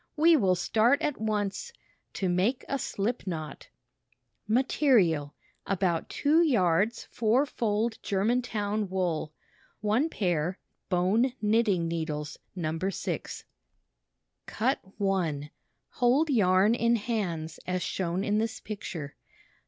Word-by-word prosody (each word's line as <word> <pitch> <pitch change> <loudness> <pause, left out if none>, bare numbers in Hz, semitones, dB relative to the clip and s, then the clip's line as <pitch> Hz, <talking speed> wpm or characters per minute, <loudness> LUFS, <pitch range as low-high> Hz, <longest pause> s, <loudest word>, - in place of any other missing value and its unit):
"We 330 +2 +6
will 190 -10 +3
start 225 +9 +3
at 290 -7 -1
once 215 - -2 0.2
— - - -44
To 190 - -1
Make 190 +9 +1
a 275 - -1
Slip 220 0 -2
Knot 155 -5 -5 0.8
Material: 215 - +2 0.3
About 180 -4 0
2 310 +4 +3
yards 215 - +2
four 235 +5 +2
fold 225 -3 -1
Germantown 210 -1 0
wool. 175 -5 -1 0.5
One 220 +9 +1
pair 180 - -1 0.3
bone 205 +8 +2
knitting 210 -5 +2
needles 155 -3 -4 0.2
No. 165 -2 -2
6. 190 +2 -3 1.0
Cut 260 +5 0 0.2
1 165 -7 -1 0.4
Hold 270 +6 +2
yarn 195 -2 +4
in 235 0 +2
hands 190 -8 -3
as 180 0 -1
shown 185 0 -2
in 210 0 +1
this 225 0 -2
picture. 170 -8 -6
205 Hz, 115 wpm, -28 LUFS, 175-235 Hz, 1.0 s, We